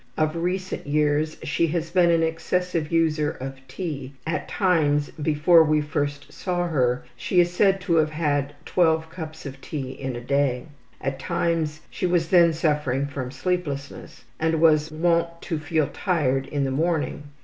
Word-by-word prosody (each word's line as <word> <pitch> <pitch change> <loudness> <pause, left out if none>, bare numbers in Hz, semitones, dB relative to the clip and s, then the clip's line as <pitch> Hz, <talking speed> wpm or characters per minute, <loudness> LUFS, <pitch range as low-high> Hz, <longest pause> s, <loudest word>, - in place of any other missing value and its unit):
Of 155 +1 +1
recent 180 0 -3
years 150 +1 +1
she 170 - +1
has 165 +1 -2
been 175 -1 +4
an 165 -1 +3
excessive 165 0 -1
user 160 -2 +2
of 135 -2 -7
tea 145 -7 -5
at 160 -1 -2
times 150 -7 +2
before 155 +2 +4
we 155 -1 +2
first 145 -1 -3
saw 175 -1 -2
her 125 -6 +1
she 180 - 0
is 175 0 +4
said 195 +1 +3
to 170 -2 +1
have 155 -1 +3
had 145 -2 -1
12 160 -2 +2
cups 160 -3 -8
of 135 -1 -8
tea 135 -4 -5
in 130 -1 -5
a - - -4
day. 130 0 0 0.4
At 135 0 -3
times 165 -1 -1
she 185 - -1
was 170 -2 +1
then 170 -2 +6
suffering 150 -4 0
from 140 -3 -5
sleeplessness, 145 -2 -4 0.2
and 160 0 +1
was 155 -1 +4
wont 170 +1 +1
to 165 -4 -2
feel 155 0 0
tired 135 -8 0
in 145 -1 -1
the 135 - -1
morning. 155 0 -1
155 Hz, 165 wpm, -24 LUFS, 145-170 Hz, 0.4 s, then